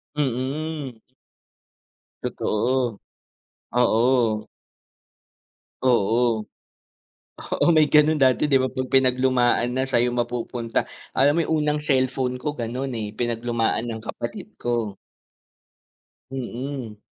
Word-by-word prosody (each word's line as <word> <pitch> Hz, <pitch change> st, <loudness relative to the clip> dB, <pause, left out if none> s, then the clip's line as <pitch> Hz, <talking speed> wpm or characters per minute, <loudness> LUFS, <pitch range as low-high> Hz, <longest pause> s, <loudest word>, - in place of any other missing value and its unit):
Mm. 140 Hz, 0 st, -2 dB, 1.3 s
Totoo, 120 Hz, +1 st, 0 dB, 0.8 s
oo. 115 Hz, -2 st, +2 dB, 1.4 s
Oo. 115 Hz, -1 st, +3 dB, 1.0 s
Oo, -, -, -1 dB
may 155 Hz, -2 st, +5 dB
ganun 150 Hz, +1 st, +5 dB
dati, 130 Hz, +1 st, +4 dB
di 135 Hz, -, +4 dB
ba, 130 Hz, -, +1 dB
'pag 130 Hz, 0 st, -4 dB
pinaglumaan 125 Hz, -2 st, +3 dB
na 130 Hz, -, +1 dB
sa'yo 120 Hz, -1 st, +2 dB
mapupunta. 120 Hz, -1 st, -2 dB, 0.3 s
Alam 140 Hz, +2 st, +5 dB
mo -, -, +2 dB
yung 160 Hz, -, 0 dB
unang 150 Hz, 0 st, +1 dB
cellphone 130 Hz, -3 st, 0 dB
ko 145 Hz, +3 st, -2 dB
ganun, 125 Hz, +1 st, -4 dB
eh, 105 Hz, -2 st, -4 dB
pinaglumaan 120 Hz, -1 st, -1 dB
ng 110 Hz, -1 st, -4 dB
kapatid -, -, -6 dB
ko. 115 Hz, -5 st, -1 dB, 1.3 s
Mm. 130 Hz, -2 st, -5 dB
125 Hz, 100 wpm, -24 LUFS, 115-135 Hz, 1.4 s, may